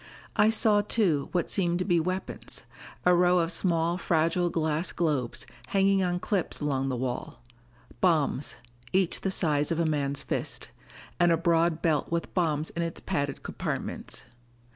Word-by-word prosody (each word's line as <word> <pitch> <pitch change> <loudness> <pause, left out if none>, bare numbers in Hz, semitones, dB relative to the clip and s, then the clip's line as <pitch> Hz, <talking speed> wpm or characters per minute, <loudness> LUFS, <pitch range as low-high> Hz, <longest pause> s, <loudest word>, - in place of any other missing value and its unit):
I 210 - +5
saw 215 -2 +4
too, 190 -9 +1
what 175 -2 0
seemed 175 -3 +1
to 180 - -1
be 175 -3 +3
weapons: 185 +3 -3 0.4
a 180 - +6
row 180 +1 +4
of 170 -1 +2
small 170 -1 +1
fragile 170 +1 +1
glass 160 0 0
globes, 145 -8 -1 0.2
hanging 195 0 +3
on 180 -1 0
clips 195 -1 -1
along 135 -2 -1
the 130 - -1
wall 125 0 -4 0.6
bombs, 155 -6 +1 0.4
each 185 -2 +2
the 195 - 0
size 150 -5 +1
of 165 - 0
a 170 - +2
man's 140 -3 -1
fist. - - -3 0.5
And 175 -1 +5
a 165 - +4
broad 170 -1 +2
belt 155 -4 +1
with 170 0 -2
bombs 155 -4 0
in 170 - -3
its 165 -1 -3
padded 145 -7 -2
compartments. - - -3
170 Hz, 160 wpm, -28 LUFS, 155-180 Hz, 0.6 s, a